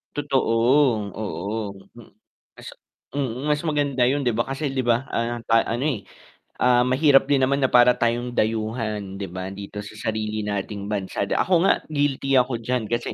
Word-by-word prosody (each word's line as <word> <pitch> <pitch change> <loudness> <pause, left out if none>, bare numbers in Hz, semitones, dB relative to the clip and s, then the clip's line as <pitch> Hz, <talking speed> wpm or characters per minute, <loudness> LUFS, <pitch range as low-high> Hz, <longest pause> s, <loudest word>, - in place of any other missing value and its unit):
Totoo 135 -5 0 0.6
oo, 100 +1 -4 1.4
mm, 130 0 -2
mas 150 0 +1
maganda 145 -5 +1
yun 140 +3 +1
'di 125 - +1
ba 120 - +1
kasi, 135 +2 -3
'di 130 -2 -2
ba, 120 +2 +2
ah, 115 0 -2 0.3
ano, 125 +5 -2
eh, 105 -8 -4 0.5
ah, 125 -1 +4
mahirap 135 +2 +4
din 140 -2 +3
naman 140 +1 0
na 130 - +3
para 125 0 +6
tayong 120 +1 -1
dayuhan, 110 -3 -2
'di 100 - -3
ba, 95 +2 -6
dito 100 +1 -7
sa - - -10 0.2
sarili 110 0 -2
nating 100 0 -4
bansa, 100 -1 -3
ako 185 - +1 0.2
nga - - +7 0.2
guilty 140 -2 0
ako 125 -1 +2
diyan 115 -1 -2
kasi 120 0 -2
120 Hz, 160 wpm, -23 LUFS, 105-135 Hz, 1.4 s, nga